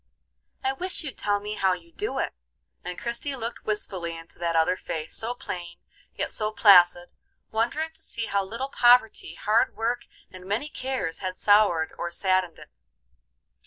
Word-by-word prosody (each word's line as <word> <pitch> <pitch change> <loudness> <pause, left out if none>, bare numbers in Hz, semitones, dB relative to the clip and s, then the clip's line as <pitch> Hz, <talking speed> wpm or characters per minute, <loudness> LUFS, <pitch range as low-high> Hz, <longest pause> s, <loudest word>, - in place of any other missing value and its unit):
I 265 0 +1
wish 365 +5 -4
you'd 280 -4 -7
tell 205 0 +1
me 210 +1 -5
how 190 -3 +2
you 170 -2 -9
do - - -3
it;" - - -1 0.5
and 180 - -5
Christie 240 +4 -3
looked 235 -2 -5
wistfully 185 -5 -3
into 165 0 -14
that 170 -1 -1
other 165 +3 +3
face, 160 -3 -5
so 235 +2 -2
plain, 175 -7 -7 0.4
yet - - -3
so 215 0 -1
placid, 175 -4 +6 0.4
wondering 240 +9 0
to 320 0 -16
see 230 -7 -3
how 200 -2 0
little 230 +8 -4
poverty, 245 -4 +4
hard 215 +2 +2
work, 240 +2 -1 0.3
and 185 -1 -11
many 225 +10 -1
cares 255 - -3
had 185 -1 -4
soured 205 -6 +4
or 175 - -2
saddened 185 0 0
it. - - -14
205 Hz, 165 wpm, -26 LUFS, 175-240 Hz, 0.5 s, placid